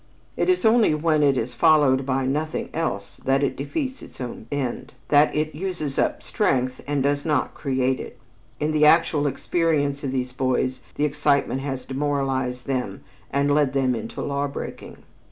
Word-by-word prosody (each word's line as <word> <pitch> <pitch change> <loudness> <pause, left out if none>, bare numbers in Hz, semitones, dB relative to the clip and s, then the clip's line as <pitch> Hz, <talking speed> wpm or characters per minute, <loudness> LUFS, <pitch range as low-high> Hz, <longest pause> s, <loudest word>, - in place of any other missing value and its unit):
It - - 0
is 365 -9 +2
only 220 -7 +5
when 155 0 +2
it 140 -2 +3
is 120 +1 -2
followed 135 0 +4
by 135 0 0
nothing 150 +4 -2
else 160 -11 -3
that 135 +1 +1
it 140 - 0
defeats 265 - -4
its - - -13
own 120 -3 -6
end, 135 -4 -3 0.2
that 145 +1 +4
it 155 +1 -1
uses 155 -4 -3
up - - 0
strength 130 -1 0
and 145 -2 0
does 145 0 +1
not 150 -4 0
create 130 -2 0
it. - - -8 0.4
In 150 +1 0
the 155 0 +2
actual 150 -2 +4
experience 145 -1 0
of 135 - -2
these 130 -1 -2
boys 130 0 -1
the 150 - +1
excitement 145 -2 +1
has 135 -2 -4
demoralized 135 -3 -1
them 130 -2 -3 0.3
and 140 +1 +1
led 145 -3 +2
them 135 -2 +2
into 110 -1 -5
law 140 0 -1
breaking. 140 - -7
140 Hz, 170 wpm, -24 LUFS, 130-150 Hz, 0.4 s, only